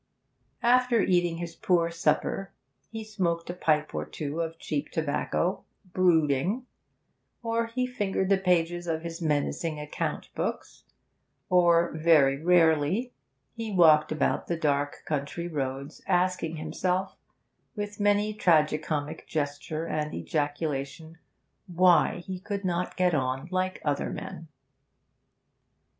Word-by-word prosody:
After 245 -1 +4
eating 175 -3 +2
his 170 -1 -5
poor 170 -2 +1
supper, 180 +3 0 0.4
he 225 -1 -6
smoked 175 -6 -2
a - - -6
pipe 155 -3 0
or - - -2
two 150 +2 -4
of 165 0 -4
cheap 150 -2 -3
tobacco, 160 +3 -1 0.3
brooding; 175 - +2 0.8
or 230 0 0
he 250 +2 -1
fingered 205 -6 -1
the 195 -1 +4
pages 175 -2 +1
of 160 -1 -2
his 170 0 -6
menacing 155 +1 -1
account 150 0 -4
books; - - -4 0.6
or, 170 -1 +4
very 150 -4 +4
rarely, 175 - +3 0.4
he 225 -2 -5
walked 160 -5 +5
about 155 - 0
the 170 - -1
dark 145 -2 -1
country 150 +3 -3
roads, 140 -2 -4
asking 180 -3 +1
himself, 180 +4 -2 0.6
with 205 -1 -5
many 205 +1 +3
a - - -4
tragi 155 -7 +3
comic 155 0 -4
gesture 155 +1 -3
and 150 -2 -3
ejaculation, 145 - -3 0.5
why 180 0 +3
he 185 -1 -5
could 200 +1 -4
not 180 0 -2
get 180 -2 +3
on 130 0 -1
like 185 0 -1
other 145 -1 0
men. 165 - -7
170 Hz, 125 wpm, -27 LUFS, 155-185 Hz, 0.8 s, walked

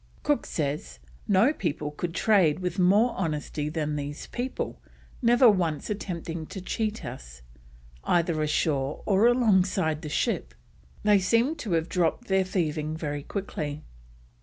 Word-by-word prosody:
Cook - - +1
says: 140 - -3 0.3
"No 205 +9 +4
people 150 - -3
could 165 +3 -4
trade 185 -9 +4
with 180 0 -3
more 205 +7 +4
honesty 150 -3 -2
than 150 -1 -2
these 145 0 -5
people, 250 +2 -4 0.4
never 240 +1 +6
once 175 -4 +1
attempting 170 -5 -4
to 195 - -7
cheat 215 +4 -3
us, 65 - -9 0.6
either 170 -2 +1
ashore 150 -2 0
or 205 +3 +4
alongside 190 -9 +2
the 150 - -6
ship." 65 - -1 0.5
They 210 -1 +5
seem 230 - +2
to 220 -11 -3
have 165 0 +1
dropped 180 +7 0
their 190 0 +3
thieving 155 -4 -2
very 145 -2 -3
quickly. 150 -4 -5
170 Hz, 135 wpm, -27 LUFS, 150-205 Hz, 0.6 s, never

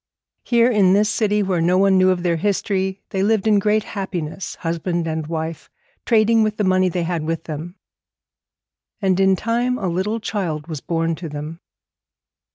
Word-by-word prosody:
Here, 235 -1 +4
in 200 -6 +4
this 210 +2 +3
city 210 -2 +1
where 185 -3 0
no 180 +2 +3
one 195 0 +4
knew 185 0 +5
of 180 -1 0
their 170 -2 +1
history, 190 0 -1
they 190 - -1
lived 210 0 +2
in 210 -2 +4
great 210 +1 +1
happiness, 190 -4 -5
husband 170 +1 -2
and 160 -1 -3
wife, 160 0 -5 0.4
trading 225 0 +4
with 215 -1 0
the 210 - 0
money 185 -1 +3
they 175 0 -2
had 170 -2 -2
with 165 +1 -3
them. 160 +3 -7 1.2
And 190 -3 +1
in 190 0 +4
time 240 +5 0
a 195 - -3
little 190 +6 -1
child 175 -9 -3
was 155 -4 -6
born 165 -1 -1
to 170 -3 -6
them. 150 +3 -7
185 Hz, 175 wpm, -21 LUFS, 165-210 Hz, 1.2 s, knew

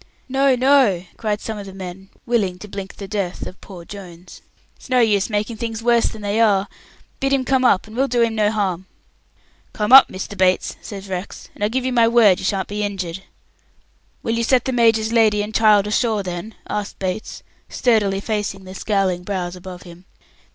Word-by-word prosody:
"No, 270 0 +3
no," 250 -8 +3
cried 210 -2 -2
some 220 -2 -5
of 200 - -8
the 190 - -10
men, 190 0 -8 0.2
willing 205 -7 0
to 210 - -10
blink 195 -1 -7
the 200 - -8
death 195 -3 -3
of 185 - -10
poor 180 -4 -11
Jones. 180 -3 -11 0.3
"It's - - -16
no 255 -1 +3
use 210 -4 +2
making 215 +2 -2
things 225 0 -4
worse 235 -1 +3
than 215 -1 -7
they 205 +2 0
are. 200 -3 +3 0.5
Bid 270 0 0
him 265 -1 +1
come 260 0 +2
up, 200 -7 +3
and 215 0 -12
we'll 270 +3 +1
do 240 -2 +2
him 230 -1 0
no 215 -1 +2
harm." 190 -4 -2 0.9
"Come 210 +2 -2
up, 270 0 +11
Mr. 190 +2 -6
Bates," 185 -1 +1
says 200 -1 -8
Rex, 185 0 -6
"and - - -7
I - - +4
give 250 +4 -2
you 260 - -1
my 235 -2 +4
word 225 -5 +5
you - - -5
sha'n't 195 -2 -1
be 205 +1 -4
injured." 190 -3 -4 1.0
"Will 225 - -1
you 230 0 0
set 250 +1 +2
the 260 - -1
major's 225 -2 +3
lady 215 -3 +3
and 210 +1 -7
child 210 -3 +4
ashore, 210 0 0
then?" 180 +4 -6
asked 210 -1 -4
Bates, 190 +3 -4 0.3
sturdily 205 -5 +1
facing 205 -3 -3
the 185 0 -10
scowling 195 -3 0
brows 185 -2 -3
above 180 0 -10
him. 175 0 -14
210 Hz, 200 wpm, -20 LUFS, 190-230 Hz, 1.0 s, up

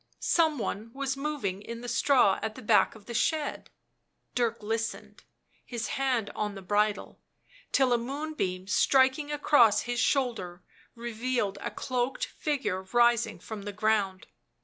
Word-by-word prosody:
Some 320 -3 +2
one 225 -1 -4
was 270 0 -2
moving 275 -10 -3
in 230 +2 -7
the 245 - -7
straw 245 -6 +3
at 220 0 -3
the - - -10
back 215 0 +4
of 210 -2 -15
the 240 - -7
shed. 300 +6 -1 0.6
Dirk 235 -2 0
listened, 225 +2 -4 0.4
his 235 -3 -4
hand 255 -6 0
on 210 -1 -3
the 195 - -9
bridle, 210 +2 0 0.5
till 265 -3 +3
a 240 - +2
moonbeam 260 -8 -3
striking 265 +7 +3
across 285 -7 +4
his 245 0 -3
shoulder 225 -11 0 0.3
revealed 235 -3 -2
a - - -3
cloaked 255 0 -2
figure 260 -11 -2
rising 235 +4 +2
from 215 -2 -7
the 205 +1 -5
ground. 205 -2 0
235 Hz, 145 wpm, -29 LUFS, 210-265 Hz, 0.6 s, back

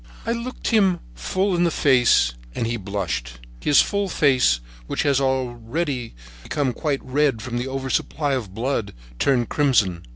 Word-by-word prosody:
I 230 - 0
looked 235 +2 -3
him 195 -6 +3
full 185 - -1
in 175 - +2
the 170 - +3
face, 125 - +4 0.2
and - - -1
he 115 +1 -1
blushed. 95 - -3 0.3
His 145 - +5
full 200 -1 -1
face, 130 - +3 0.3
which - - -1
was 140 -2 +2
already 130 - -2 0.9
red 135 -2 +1
from 120 -2 -4
the 125 - -3
oversupply 135 +2 -1
of 115 -8 -3
blood, 115 - -2 0.2
turned 125 -4 +2
crimson. 115 - +2
130 Hz, 140 wpm, -23 LUFS, 115-150 Hz, 0.9 s, His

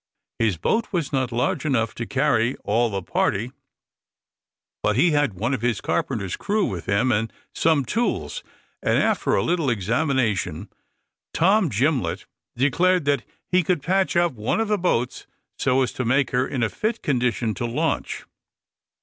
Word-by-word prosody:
His 110 -6 +1
boat 225 - 0
was 165 -6 -2
not 130 -2 0
large 120 +1 0
enough 120 -7 0
to 115 - -5
carry 130 -3 +1
all 115 +3 +2
the 100 -3 -3
party, 110 +7 0 1.3
but 105 - +1
he 160 +8 +4
had 145 -8 +1
one 115 +8 -1
of 130 - -2
the 120 -1 +1
carpenter's 95 +2 -2
crew 205 0 0
with 90 -4 -5
him, 100 +7 +2
and 115 0 0 0.2
some 155 -4 +2
tools; 235 - -1 0.4
and, - - +2
after - - +2
a - - +2
little 170 -5 +1
examination, 110 - 0 0.7
Tom 190 +2 +3
Gimlett 130 +4 0 0.3
declared 170 +6 +2
that 140 -3 +2 0.3
he 185 0 +3
could 170 -3 0
patch 190 +1 +1
up 175 -1 +3
one 110 - -1
of 225 -1 0
the 210 -1 +1
boats 125 -9 -1 0.3
so 130 +1 +3
as 125 - -2
to 130 - -3
make 130 +2 +2
her 125 +1 +1
in 130 -4 -2
a 115 - +1
fit 220 - -2
condition 125 -4 0
to 120 +5 -3
launch. 150 +6 -2
130 Hz, 165 wpm, -23 LUFS, 115-160 Hz, 1.3 s, he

